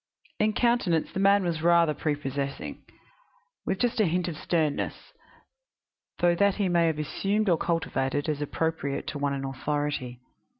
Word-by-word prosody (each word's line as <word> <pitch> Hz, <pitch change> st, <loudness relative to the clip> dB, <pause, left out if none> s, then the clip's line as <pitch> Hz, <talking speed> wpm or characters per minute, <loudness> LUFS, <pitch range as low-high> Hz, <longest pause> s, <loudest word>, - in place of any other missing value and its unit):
In 215 Hz, 0 st, +2 dB
countenance 235 Hz, -10 st, +1 dB
the -, -, -2 dB
man 200 Hz, 0 st, +4 dB
was 170 Hz, -3 st, -1 dB
rather 170 Hz, -2 st, +4 dB
prepossessing, 140 Hz, -2 st, -3 dB, 0.8 s
with -, -, 0 dB
just 240 Hz, +2 st, 0 dB
a 205 Hz, -, +3 dB
hint 180 Hz, +2 st, 0 dB
of 170 Hz, -, -4 dB
sternness; 155 Hz, -2 st, -2 dB, 1.0 s
though 175 Hz, 0 st, +3 dB
that 200 Hz, +2 st, +3 dB
he 200 Hz, -3 st, 0 dB
may 170 Hz, -1 st, +3 dB
have 160 Hz, -2 st, 0 dB
assumed 200 Hz, +8 st, -1 dB
or 170 Hz, -3 st, +4 dB
cultivated, 145 Hz, -4 st, -1 dB
as 150 Hz, -2 st, -1 dB
appropriate 145 Hz, -1 st, -2 dB
to 145 Hz, -, -5 dB
one 140 Hz, -1 st, 0 dB
in 135 Hz, 0 st, -4 dB
authority. 135 Hz, -2 st, -3 dB
165 Hz, 155 wpm, -27 LUFS, 145-185 Hz, 1.0 s, man